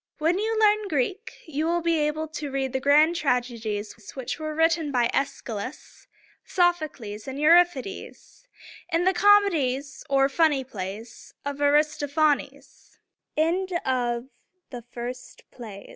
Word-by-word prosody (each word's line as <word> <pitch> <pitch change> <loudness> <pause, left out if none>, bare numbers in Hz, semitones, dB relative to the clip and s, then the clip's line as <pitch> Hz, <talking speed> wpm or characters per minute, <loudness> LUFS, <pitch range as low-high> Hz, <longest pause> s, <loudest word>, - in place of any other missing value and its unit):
When 330 +5 +1
you 445 +1 -1
learn 425 -1 +3
Greek, 370 - -2
you 315 0 -2
will 345 0 0
be 335 -1 +2
able 300 +1 -1
to 300 -2 -5
read 270 -1 -2
the 265 - 0
grand 300 +5 +4
tragedies 240 -7 -2 0.2
which 260 +1 -5
were 310 -1 -4
written 325 -1 +2
by 240 -3 +2
Æs´chy 275 -1 -2
lus, 220 +7 -8 0.4
Soph´o 350 -3 +1
cles, 210 -2 -9
and 265 0 -5
Eu 300 +1 +4
rip´i 345 -5 +5
des, 390 - -8 0.7
and 335 +2 +1
the 375 - +4
comedies 320 -10 +3
or 270 0 +4
funny 290 -1 +2
plays 215 0 -8
of 285 0 -4
Ar 290 0 +5
is 300 0 +3
toph´a 290 +1 +3 0.2
nes. - - -23 0.4
XXXV 285 -8 0
295 Hz, 140 wpm, -25 LUFS, 265-335 Hz, 0.7 s, rip´i